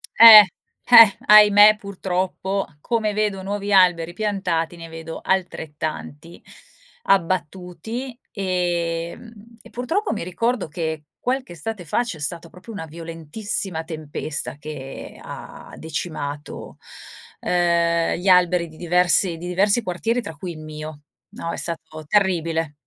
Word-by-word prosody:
Eh, 225 -1 +12 0.5
eh, 230 -4 +9
ahimè 210 0 +8
purtroppo, 190 0 -3 0.2
come 220 -3 -1
vedo 210 -2 -1
nuovi 200 +1 -3
alberi 175 -3 +4
piantati, 180 -5 -2
ne 165 0 -9
vedo 165 0 -8
altrettanti 160 -3 -4 0.7
abbattuti, 190 - -2
ehm, 175 +1 -3 0.3
e 235 - -16
purtroppo 325 - -2
mi 205 - -4
ricordo 220 +4 -2
che 160 -1 -4 0.2
qualche 255 -5 -3
estate 195 +4 -6
fa 195 - 0
c'è 205 -10 -6
stata 165 +2 -3
proprio 185 +7 -13
una 180 -5 -6
violentissima 165 +2 -5
tempesta 155 -3 -5
che 145 -3 -9
ha - - -11
decimato, 150 -2 -6 0.6
ehm, 170 -1 +1
gli 180 +3 -5
alberi 180 -1 +4
di 160 - -16
diversi 175 0 +2
di 175 - -8
diversi 200 +6 +2
quartieri 225 +7 -2
tra 160 -8 -8
cui 175 +4 -7
il 155 - -11
mio, 155 -1 -9 0.3
no, 165 - -5
è - - -5
stato 160 -2 -6
terribile. 165 -6 0
180 Hz, 125 wpm, -22 LUFS, 165-205 Hz, 0.7 s, Eh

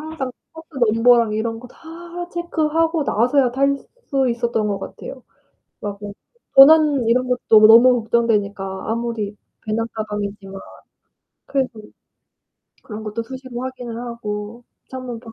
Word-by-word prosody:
항상 310 -4 -5 0.2
버스 320 0 -12
넘버랑 230 0 +4
이런 225 +1 -3
거 250 - -11
다 345 +4 -9
체크하고 330 -1 0
나서야 250 +3 +2
탈 275 +2 +1 0.3
수 270 -2 +1
있었던 235 -2 -1
것 200 -1 -2
같아요. 255 +6 -9 0.6
막 205 -1 -5
뭐 205 -1 -7 0.4
도난 290 -2 +7
이런 250 +2 +2
것도 225 -3 +4
너무 240 +2 +7
걱정되니까 205 -5 -1
아무리 225 -3 -3 0.3
배낭 225 +1 -1
가방이지만 205 -2 -5 0.9
그래도 260 -5 -2 1.0
그런 215 -1 -8
것도 215 +2 -4
수시로 255 0 -8
확인을 250 -3 -6
하고 235 -1 -6 0.3
창문 255 -2 -6
밖 225 -2 -12
235 Hz, 275 characters per minute, -20 LUFS, 215-265 Hz, 1.0 s, 도난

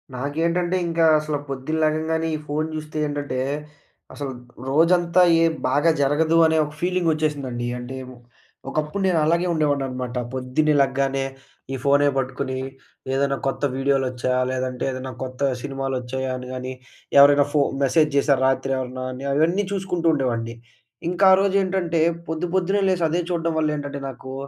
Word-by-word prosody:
నాకేంటంటే 165 +6 0
ఇంకా 165 0 +2
అసల 150 -1 -2
పొద్దున్న 135 +4 -3
లెగంగానే 160 +1 0
ఈ - - -2
ఫోన్ 155 +2 -1
జూస్తే 155 0 -6
ఏంటంటే, 145 -3 -3 0.7
అసలు 140 -2 -5 0.4
రోజంతా 170 +4 +3 0.2
ఏ - - +5 0.2
బాగా 145 +5 +3
జరగదు 155 +4 +2
అనే 160 0 +3
ఒక 150 - -8
ఫీలింగొచ్చేసిందండి. 155 -8 -1
అంటే 125 +2 -7 0.2
ఒ - - -14 0.5
ఒకప్పుడు 155 +7 -2
నేను 175 -3 +2
అలాగే 170 +3 +2
ఉండేవాడిననమాట. 135 -5 -1 0.2
పొద్దున్నే 130 +4 +1
లెగ్గానే 135 0 0 0.5
ఈ - - -1
ఫోనే 140 +1 +4
పట్టుకుని, 130 0 -2 0.6
ఏదన్నా 140 0 +1
కొత్త 135 - -2
వీడియోలొచ్చాయా, 130 -2 0
లేదంటే 130 -1 -3
ఏదన్నా 130 0 -5
కొత్త 130 +2 -1
సినిమాలొచ్చాయా? 130 -1 -3
అని 125 - -8
గానీ 130 0 -5 0.5
ఎవరైనా 145 0 +7
ఫో 150 - +3 0.2
మెసేజ్ 150 +3 +3
జేశారా 140 -1 +3
రాత్రెవరన్నా? 130 -1 -1
అని 130 +2 -7
అవన్నీ 170 +7 +2
చూసుకుంటూ 180 -3 -1
ఉండేవాడిని. 115 -5 -1 0.5
ఇంక 180 +2 -4
ఆ - - +9
రోజేంటంటే, 190 -4 +1 0.3
పొద్దు 160 +2 -2
పొద్దున్నే 195 +2 +1
లేసి 180 -3 +1
అదే 175 +2 0
చూడడం 165 -1 -1
వల్ల 155 - +1
ఏంటంటే, 140 -1 -5
నాకూ 130 0 -9
145 Hz, 140 wpm, -23 LUFS, 130-165 Hz, 0.7 s, ఆ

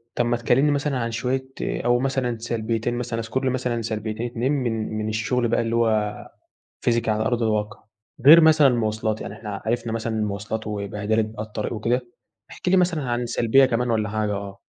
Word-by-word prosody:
طَب 120 - +1
ما 120 0 +1
تكلمني 130 +5 +3
مثلًا 145 -1 0
عن 115 -1 -2
شويّة 125 +3 -1 0.2
أو 120 +1 +1
مثلًا 130 -3 -1
سلبيتين 115 0 -2
مثلًا 120 -1 -3
اذكر 115 +4 -3
لي 130 - +2
مثلًا 125 -2 -1
سلبيتين 110 +1 -3
2 120 +3 -1
من 115 -6 -1
من 110 0 -2
الشغل 115 +3 0
بقى 115 - +1
اللي 115 0 -1
هو، 110 -3 +1 0.7
physical 115 -1 +1
على 110 0 +1
أرض 120 -1 0
الواقع، 105 -1 -1 0.4
غير 165 +3 +11
مثلًا 155 -2 +6
المواصلات 110 -2 -1
يعني - - -6
إحنا 105 -3 -7
عرفنا 115 0 -1
مثلًا 115 0 -2
المواصلات 105 +1 -3
وبهدلة 105 +1 -1
بقى 110 0 -5
الطريق 110 +1 -4
وكده، 120 +3 0 0.5
احكِ - - -5
لي 190 - +4
مثلًا 175 -4 +2
عن 120 -1 -1
سلبيّة 120 +3 +4
كمان 120 -1 0
والَّا 110 -2 0
حاجة، 105 0 -1
آه. 100 0 -7
115 Hz, 185 wpm, -23 LUFS, 110-125 Hz, 0.7 s, غير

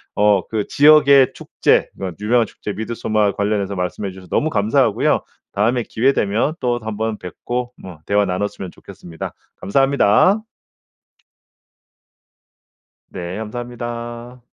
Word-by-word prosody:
어 105 -2 +4
그 110 -2 -2
지역의 140 -2 +6
축제 - - +1
그 95 -2 -4
유명한 115 +2 +3
축제 105 - -7
미드소마 110 -2 0
관련해서 100 -1 -1
말씀해 90 +2 -3
주셔서 95 0 -13
너무 155 - +1
감사하고요. 110 +1 +2 0.3
다음에 115 +4 +1
기회 130 +5 +2
되면 110 +8 0
또 120 -2 0
한번 110 0 -3
뵙고 120 +8 -5
음 90 -4 -9
대화 100 0 +2
나눴으면 95 0 -3
좋겠습니다. 85 -2 -9 0.3
감사합니다. 135 - +3 2.7
네, 90 +2 -5
감사합니다. 120 +1 -6
110 Hz, 285 characters per minute, -19 LUFS, 100-120 Hz, 2.7 s, 지역의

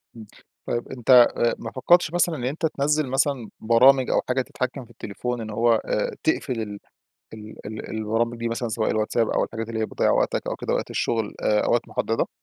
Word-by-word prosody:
امم. 110 -2 -10 0.4
طيّب 120 0 -2
أنت 125 -1 +6 0.3
ما 115 - -6
فكرتش 175 +5 +3
مثلًا 175 -1 +2
إن 125 - -6
أنت 145 +6 -2
تنزل 150 -1 0
مثلًا 135 -3 0
برامج 125 +4 +5
أو - - +2
حاجة 130 +1 +2
تتحكم 130 +1 -4
في 120 - -19
التليفون 120 +2 -5
إن 110 - -6
هو 115 +2 +2
آآ - - -1
تقفل 120 -3 0
ال 105 -1 -6 0.6
ال 110 0 -9
البرامج 115 +2 -1
دي 115 0 -2
مثلًا 115 +1 -3
سواء 110 0 -1
الwhatsapp 110 +1 0
أو - - +2
الحاجات 115 0 -6
اللي 110 -1 -3
هي 110 - 0
بتضيع - - 0
وقتك - - 0
أو - - -2
كده - - -2
وقت - - -3
الشغل 110 -3 -1
آآ 105 0 +2
أو - - +1
وقت 120 0 0
محددة؟ 115 - -1
120 Hz, 200 wpm, -24 LUFS, 110-130 Hz, 0.6 s, أنت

